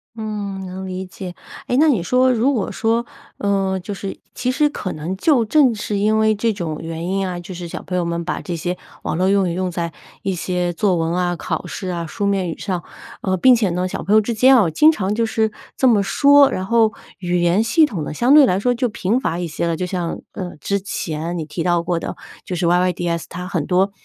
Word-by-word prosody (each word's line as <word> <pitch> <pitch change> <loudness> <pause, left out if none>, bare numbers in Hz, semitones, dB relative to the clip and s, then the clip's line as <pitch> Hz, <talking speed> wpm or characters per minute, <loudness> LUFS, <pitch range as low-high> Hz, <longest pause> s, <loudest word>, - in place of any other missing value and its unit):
嗯， 205 -3 -4
能 185 +1 -6
理 185 0 -4
解。 180 0 -8 0.3
诶， 245 - +1
那 315 +3 +5
你 240 - +3
说 255 +7 +3
如 245 +4 +2
果 220 -7 -1
说， 230 +1 0 0.3
呃， 195 -1 0
就 195 +3 -6
是 195 0 -6
其 250 0 -1
实 295 +3 +3
可 195 -10 -5
能 160 +5 -4
就 245 +3 +3
正 265 +1 +4
是 210 -1 -3
因 215 +2 +2
为 220 0 +3
这 225 +2 +1
种 170 -7 -4
原 165 0 -5
因 195 +1 0
啊， 180 -1 -4
就 175 +2 -8
是 175 -1 -6
小 - - -7
朋 180 - -4
友 180 - +1
们 170 0 -3
把 180 - -3
这 175 - -4
些 175 +2 -2 0.3
网 - - -2
络 185 +2 +2
用 195 -1 +3
语 - - -2
用 185 +1 -1
在 170 -1 -3 0.3
一 195 - 0
些 180 0 -1
作 190 +1 +1
文 165 0 0
啊， 175 0 0
考 - - -4
试 185 - -5
啊， 170 -2 -3
书 200 - -3
面 195 -3 0
语 165 - -5
上， 180 -4 -3 0.4
呃， 185 -1 0
并 255 +7 +6
且 220 -5 +1
呢， 180 +1 -1
小 - - -5
朋 200 - +1
友 - - +8
之 215 +2 -1
间 255 +4 +6
啊 200 -8 +4
经 305 - +6
常 205 -9 -2
就 230 +1 +1
是 220 -1 0 0.3
这 260 - +4
么 220 -4 +4
说， 280 +7 +5
然 185 - -3
后 225 +1 +3 0.3
语 180 -1 0
言 175 +5 +3
系 310 +8 +4
统 195 - -4
呢 - - -5
相 240 - +3
对 295 -2 +9
来 185 -2 +1
说 245 +4 +2
就 245 0 0
贫 210 +3 0
乏 170 -10 -2
一 175 - -2
些 165 +2 -2
了。 165 - 0
就 180 - 0
像， 180 -2 -3
呃， 180 -2 -6
之 200 +7 -1
前 170 -3 -4
你 160 - -3
提 150 +2 -4
到 175 -1 +1
过 170 0 -1
的， - - -5 0.3
就 180 - -4
是 175 0 -1
yyds 175 -1 +1
它 180 +1 -6
很 170 -6 -2
多， 190 +3 +2
190 Hz, 270 characters per minute, -20 LUFS, 175-220 Hz, 0.4 s, 对